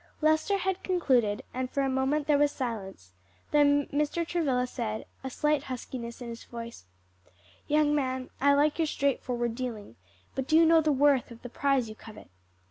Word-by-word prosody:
Lester 315 Hz, +6 st, +2 dB
had 380 Hz, -1 st, -2 dB
concluded, 255 Hz, -, +1 dB
and 255 Hz, 0 st, -3 dB
for 280 Hz, -, -1 dB
a -, -, +1 dB
moment 265 Hz, +3 st, 0 dB
there 295 Hz, -1 st, +3 dB
was 290 Hz, 0 st, +3 dB
silence, 195 Hz, -, -5 dB, 0.4 s
then 285 Hz, -1 st, +4 dB
Mr. 300 Hz, +4 st, 0 dB
Travilla 275 Hz, -8 st, 0 dB
said 225 Hz, -4 st, -4 dB, 0.2 s
a 265 Hz, -, -3 dB
slight 300 Hz, +2 st, 0 dB
huskiness 245 Hz, -1 st, -6 dB
in 235 Hz, -, -7 dB
his 230 Hz, 0 st, -8 dB
voice, 235 Hz, -, -9 dB, 0.8 s
"Young 300 Hz, 0 st, +3 dB
man, 260 Hz, -3 st, -2 dB
I 280 Hz, +1 st, +5 dB
like 295 Hz, +3 st, +2 dB
your 320 Hz, -, +2 dB
straightforward 250 Hz, -5 st, -1 dB
dealing; 230 Hz, -, -6 dB, 0.4 s
but 265 Hz, -1 st, -3 dB
do 315 Hz, -, +4 dB
you 330 Hz, -, +6 dB
know 325 Hz, 0 st, +6 dB
the 310 Hz, -1 st, +2 dB
worth 280 Hz, -2 st, +3 dB
of 235 Hz, -1 st, -13 dB
the 245 Hz, -, -7 dB
prize 270 Hz, -1 st, +1 dB
you 215 Hz, -, -7 dB
covet?" 215 Hz, -, -13 dB
270 Hz, 180 wpm, -28 LUFS, 240-295 Hz, 0.8 s, you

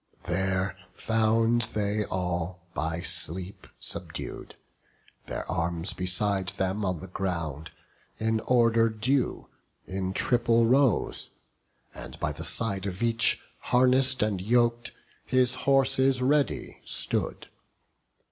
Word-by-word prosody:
There 95 Hz, +2 st, -1 dB, 0.2 s
found 115 Hz, +1 st, +2 dB
they 105 Hz, 0 st, 0 dB
all 90 Hz, -1 st, -3 dB
by 80 Hz, +1 st, -2 dB
sleep 90 Hz, +5 st, -1 dB
subdued; -, -, -7 dB, 0.7 s
their -, -, -4 dB
arms 85 Hz, 0 st, -1 dB
Beside 95 Hz, +1 st, 0 dB
them 95 Hz, +2 st, -2 dB
on 90 Hz, -4 st, -2 dB
the -, -, -7 dB
ground, 85 Hz, -5 st, -4 dB, 0.5 s
in 110 Hz, 0 st, 0 dB
order 115 Hz, -2 st, +4 dB
due, 120 Hz, +5 st, -1 dB, 0.4 s
In 95 Hz, 0 st, -3 dB
triple 115 Hz, +1 st, +3 dB
rows; 130 Hz, -3 st, +2 dB, 0.6 s
and -, -, -10 dB
by -, -, -1 dB
the -, -, -7 dB
side 100 Hz, -4 st, 0 dB
of 95 Hz, +4 st, -4 dB
each, 115 Hz, 0 st, +3 dB, 0.2 s
Harness'd 130 Hz, 0 st, +3 dB
and 100 Hz, -4 st, -1 dB
yok'd, 120 Hz, +2 st, +2 dB, 0.3 s
his 130 Hz, 0 st, +2 dB, 0.2 s
horses 135 Hz, -1 st, +3 dB
ready 140 Hz, +3 st, 0 dB
stood. -, -, +1 dB
105 Hz, 110 wpm, -27 LUFS, 95-120 Hz, 0.7 s, order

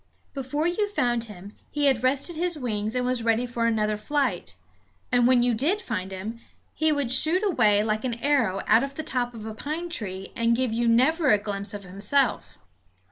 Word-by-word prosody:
Before 285 Hz, +3 st, -2 dB
you 410 Hz, +4 st, 0 dB
found 240 Hz, -, 0 dB
him 205 Hz, -1 st, -11 dB
he 295 Hz, -1 st, 0 dB
had 265 Hz, -4 st, +3 dB
rested 275 Hz, +6 st, +1 dB
his 345 Hz, 0 st, -1 dB
wings 220 Hz, -4 st, -2 dB
and 250 Hz, 0 st, 0 dB
was 250 Hz, -1 st, 0 dB
ready 230 Hz, +1 st, +1 dB
for 235 Hz, -1 st, -1 dB
another 215 Hz, -2 st, 0 dB
flight; 215 Hz, -, -2 dB, 0.6 s
and 245 Hz, -1 st, +4 dB
when 250 Hz, -1 st, +4 dB
you 245 Hz, -1 st, +2 dB
did 300 Hz, -, +1 dB
find 190 Hz, -, -5 dB
him 210 Hz, +5 st, -6 dB, 0.3 s
he 315 Hz, 0 st, +1 dB
would 285 Hz, -5 st, -1 dB
shoot 315 Hz, +9 st, +5 dB
away 215 Hz, -, +3 dB
like 215 Hz, 0 st, -1 dB
an 245 Hz, -3 st, -2 dB
arrow 235 Hz, -7 st, +1 dB
out 225 Hz, +4 st, +4 dB
of 275 Hz, 0 st, -5 dB
the 315 Hz, -, -4 dB
top 245 Hz, -4 st, -2 dB
of 220 Hz, -1 st, -9 dB
a 220 Hz, -, -6 dB
pine 310 Hz, +9 st, -5 dB
tree 195 Hz, -, -4 dB
and 230 Hz, 0 st, +2 dB
give 250 Hz, -2 st, -1 dB
you 235 Hz, +1 st, 0 dB
never 275 Hz, +7 st, +3 dB
a 210 Hz, -, +5 dB
glimpse 200 Hz, 0 st, -3 dB
of 200 Hz, -, -8 dB
himself. 205 Hz, +9 st, -1 dB
240 Hz, 200 wpm, -25 LUFS, 215-285 Hz, 0.6 s, shoot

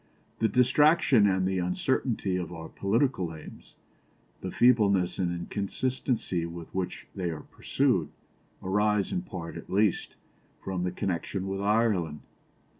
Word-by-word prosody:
The 110 Hz, -, +3 dB
distraction 130 Hz, -1 st, +4 dB
and 95 Hz, -1 st, +2 dB
the 95 Hz, -1 st, 0 dB
uncertainty 95 Hz, +2 st, 0 dB
of 90 Hz, -2 st, -3 dB
our 80 Hz, -2 st, -7 dB
political 100 Hz, -, 0 dB
aims, 80 Hz, -, -13 dB, 0.7 s
the 95 Hz, -, -4 dB
feebleness 100 Hz, -5 st, +3 dB
and 90 Hz, -2 st, +1 dB
inconsistency 100 Hz, +2 st, -2 dB
with 85 Hz, -1 st, -9 dB
which 95 Hz, -1 st, -3 dB
they 90 Hz, -3 st, -2 dB
are 80 Hz, -2 st, -5 dB
pursued, -, -, 0 dB, 0.5 s
arise, 105 Hz, +1 st, +1 dB
in 185 Hz, -, -1 dB
part 90 Hz, -, -7 dB
at -, -, -10 dB
least, 100 Hz, -1 st, +1 dB, 0.4 s
from 95 Hz, -2 st, -4 dB
the 90 Hz, 0 st, -1 dB
connection 95 Hz, 0 st, -3 dB
with 95 Hz, 0 st, -3 dB
Ireland. 100 Hz, -7 st, +1 dB
95 Hz, 130 wpm, -28 LUFS, 90-110 Hz, 0.7 s, distraction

